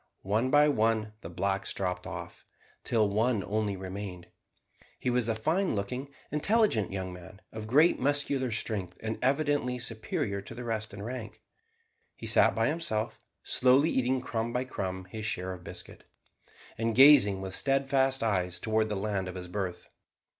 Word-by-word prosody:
One 110 +6 +1
by 145 +2 +6
one 110 -5 +1
the 80 - -7
blacks 95 +3 -1
dropped 90 -1 -3
off, - - -8 0.4
till 110 -3 +2
one 110 +1 +1
only 105 -1 -1
remained. 95 -1 -6 0.7
He 125 - -1
was 120 -2 +1
a 115 - +1
fine 160 - 0
looking, 125 +8 -3 0.2
intelligent 150 - +2
young 95 -1 -4
man, 90 +2 -12
of 110 -1 -7
great 150 +9 +4
muscular 140 -1 0
strength, 105 -5 -3
and 110 0 -3
evidently 140 -2 +1
superior 110 -4 -2
to 110 +4 -10
the 125 - -6
rest 110 -2 -3
in 100 +1 -8
rank. 120 -2 -7 0.7
He - - -9
sat - - +4
by 115 - +2
himself, 145 -8 -1 0.2
slowly 130 +5 +4
eating 130 0 +1
crumb 115 -2 -2
by 125 +1 0
crumb 95 -6 -4
his 110 +3 -6
share 95 -2 -2
of 90 -1 -11
biscuit, - - -10 0.8
and 115 -1 0
gazing 130 -7 +7
with 95 -1 -6
steadfast 135 0 +1
eyes 90 -5 0
towards 110 +2 +1
the 105 - -1
land 100 -1 -2
of 90 - -6
his 90 -1 -6
birth. 90 -1 -4
110 Hz, 160 wpm, -29 LUFS, 100-130 Hz, 0.8 s, gazing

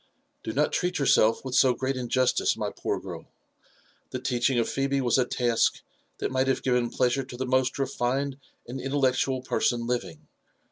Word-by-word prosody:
" - - -47
Do - - -3
not 145 +6 +1
treat 180 0 0
yourself 115 -4 +3
with 130 - -4
so 125 -1 +4
great 130 +2 -2
injustice, 130 0 +1
my - - -2
poor - - -3
girl. - - -8 0.8
The - - -4
teaching 125 0 0
Phebe 135 +3 -1
was 125 0 +2
a 125 - +3
task 120 -2 +1 0.4
that - - -3
might 130 0 +1
have 135 - 0
given 125 -2 +1
pleasure 130 +2 +1
to 125 -1 -10
the 130 - -2
most 130 0 +1
refined 135 +1 -1 0.3
and 130 +2 -6
intellectual 130 -1 0
person 120 -2 0
living. 95 -10 -4
130 Hz, 175 wpm, -27 LUFS, 120-135 Hz, 0.8 s, so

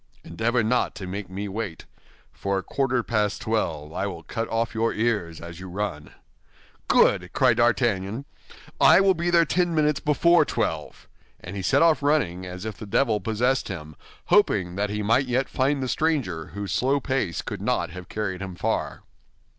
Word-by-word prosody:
"Endeavor 115 +8 0
not 125 +3 +1
to 95 - -6
make 95 +1 -5
me 100 +2 -5
wait; 100 -4 -5 0.5
for 100 0 -2
at 95 - -4
quarter 130 -3 0
past 105 -3 0
twelve 80 -9 -2
I - - -2
will - - -7
cut 115 0 -4
off 115 +1 -1
your 115 0 +1
ears 105 -8 -1
as 85 0 -9
you 95 0 -8
run." 90 -6 -4 0.8
"Good!" - - +3
cried - - +3
D'Artagnan, 110 0 +1 0.5
"I - - +7
will 195 -1 +5
be 170 0 -1
there 170 -1 +5
ten 175 +1 +1
minutes 150 -2 +2
before 170 +4 +4
twelve." - - -3 0.3
And 90 +3 -8
he 100 - -3
set 140 - +3
off 165 -3 +4
running 105 - 0
as 90 +3 -7
if 110 -3 -5
the 110 - -8
devil 110 +1 +2
possessed 115 +6 0
him, 80 -5 -7 0.3
hoping 90 -3 +2
that 100 +1 -1
he 105 0 -2
might 120 +6 +2
yet 125 +2 0
find 135 +1 0
the - - -2
stranger, 125 - -1
whose 100 -2 -4
slow 135 +3 +2
pace 130 - -2
could - - -6
not - - 0
have 90 0 -9
carried 100 -3 -3
him 95 -2 -6
far. - - -2
110 Hz, 180 wpm, -25 LUFS, 95-130 Hz, 0.8 s, I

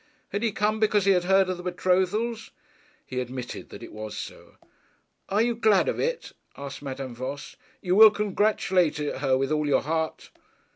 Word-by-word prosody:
Had 200 - -3
he 230 -2 +1
come 210 +2 0
because 210 -2 +2
he 200 - +5
had 180 -2 +2
heard 190 0 +4
of 185 -1 -2
the - - -8
betrothals? 190 +6 0 0.6
He 130 - -4
admitted 125 0 -6
that - - -10
it - - -10
was 110 0 -7
so. - - -9 0.7
'And 210 +4 +2
you 240 - +1
are - - -10
glad 215 -4 +3
of - - -1
it?' 485 0 -2 0.3
asked 140 -1 -7
Madame 135 -2 -6
Voss. 130 +4 -6 0.3
'You 180 -1 +1
will 220 +1 +10
congratulate 200 -5 +1
her 135 -3 0
with 135 +2 -1
all 150 -1 0
your 145 - +2
heart?' 160 +2 -3
180 Hz, 185 wpm, -26 LUFS, 140-210 Hz, 0.7 s, will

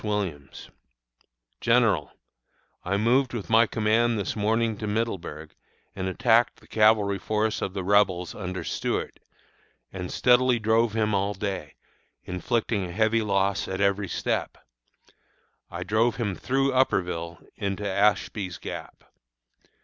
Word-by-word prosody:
Williams_: 95 -10 -4 0.9
GENERAL: - - +2 0.7
I 100 +2 0
moved 120 +4 +2
with 115 -1 -5
my 115 +1 +6
command 115 +2 +1
this 100 - -3
morning 110 +1 +1
to 105 - -4
Middleburg, 95 -8 -3 0.4
and 95 -1 -3
attacked 115 +5 +2
the - - -20
cavalry 105 -2 +3
force 110 +4 -1
of 95 - -3
the 95 - -2
Rebels 95 -3 +2
under 90 -3 -5
Stuart, - - -3 0.7
and 90 -2 -5
steadily 125 0 +4
drove 110 0 +2
him 110 -1 0
all 100 +1 0
day, 95 -7 -4 0.5
inflicting 105 +3 -1
a 90 - -5
heavy 110 +4 +2
loss 100 -1 0
at 95 0 -4
every 100 0 +1
step. - - -2 1.1
I 90 +1 -5
drove 110 +5 +1
him 105 -5 -2
through 135 +6 0
Upperville 90 -9 0 0.2
into 100 0 -3
Ashby's 100 -2 0
Gap. - - -8
105 Hz, 125 wpm, -26 LUFS, 95-115 Hz, 1.1 s, my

